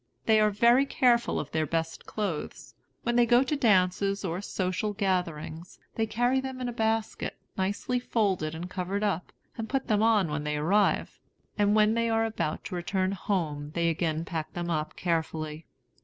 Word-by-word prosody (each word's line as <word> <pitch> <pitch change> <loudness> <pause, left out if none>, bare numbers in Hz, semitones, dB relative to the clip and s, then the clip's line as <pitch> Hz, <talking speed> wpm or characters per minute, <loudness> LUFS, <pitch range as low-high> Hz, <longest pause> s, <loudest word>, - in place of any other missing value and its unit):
They 220 -1 +5
are 215 0 +4
very 235 +6 +4
careful 240 -3 +2
of 150 - -5
their 155 -1 0
best 165 +1 -3
clothes. 200 -8 -4 0.3
When 240 0 +1
they 240 -1 +5
go 240 +2 +5
to 275 +3 -1
dances, 195 -4 +2
or 175 +1 -2
social 195 +2 -2
gatherings, 180 -4 -2 0.2
they 225 -1 0
carry 245 +4 +1
them 265 -1 -6
in 250 - -2
a 240 - -3
basket, 225 -1 -1 0.2
nicely 205 +5 -1
folded 190 -10 0
and 170 +2 -5
covered 190 +2 -3
up, 190 -4 -1 0.3
and 225 - -4
put 270 -1 0
them 210 -1 +3
on 215 -7 +3
when 150 0 -2
they 150 0 -1
arrive; 195 +7 +1 0.4
and 205 0 +3
when 215 0 +4
they 230 0 +1
are 225 0 +2
about 215 -8 -2
to - - -5
return 185 +2 -1
home 155 -7 -2
they 170 -1 +2
again 160 -1 -1
pack 160 -3 -4
them 175 0 -3
up 155 -1 -2
carefully. 160 -2 -2
195 Hz, 180 wpm, -28 LUFS, 165-225 Hz, 0.4 s, They